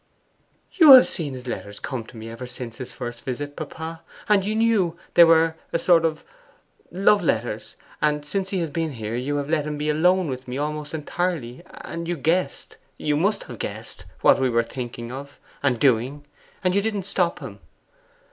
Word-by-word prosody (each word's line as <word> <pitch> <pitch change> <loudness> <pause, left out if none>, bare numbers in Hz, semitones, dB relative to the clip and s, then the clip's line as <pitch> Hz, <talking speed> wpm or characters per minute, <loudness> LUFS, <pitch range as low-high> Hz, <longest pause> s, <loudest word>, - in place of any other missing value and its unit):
'You 315 -6 +9
have 255 - +10
seen 145 -6 -4
his 125 0 -9
letters 100 -4 -5
come 125 -3 -4
to 115 - -13
me 110 0 -8
ever 125 +2 -7
since 125 -2 -7
his 130 - -6
first 120 -1 -7
visit, 145 +3 -4
papa, 160 +1 -7 0.3
and 205 -2 +4
you 210 +2 -1
knew 215 -7 +2 0.2
they 170 - +9
were 165 -1 +5 0.2
a - - +1
sort 170 -1 +4
of 160 -1 -1 0.7
love 200 +3 +3
letters; 110 -7 -2 0.3
and 150 -1 +1
since 195 +5 -2
he 195 - -2
has 165 -3 -3
been 160 -1 -2
here 110 -2 -5
you 130 +4 -2
have 145 -1 -2
let 155 -1 0
him 150 -1 -3
be 150 +1 0
alone 180 +4 +3
with 130 -1 -5
me 125 +1 -4
almost 150 +1 -3
entirely; 155 -5 -3
and 170 0 -7
you 175 0 -2
guessed, 165 +6 -1 0.2
you 150 -1 0
must 195 +8 +1
have 120 -4 -10
guessed, 105 -3 -7 0.2
what - - +5
we 130 - +3
were 115 -1 +2
thinking 120 -1 -6
of, 140 +2 -8 0.2
and 130 -5 +1
doing, 135 +3 +1 0.4
and 185 -1 +2
you 200 - +3
didn't 210 -2 -2
stop 180 -3 0
him. - - -9
150 Hz, 195 wpm, -24 LUFS, 125-170 Hz, 0.7 s, have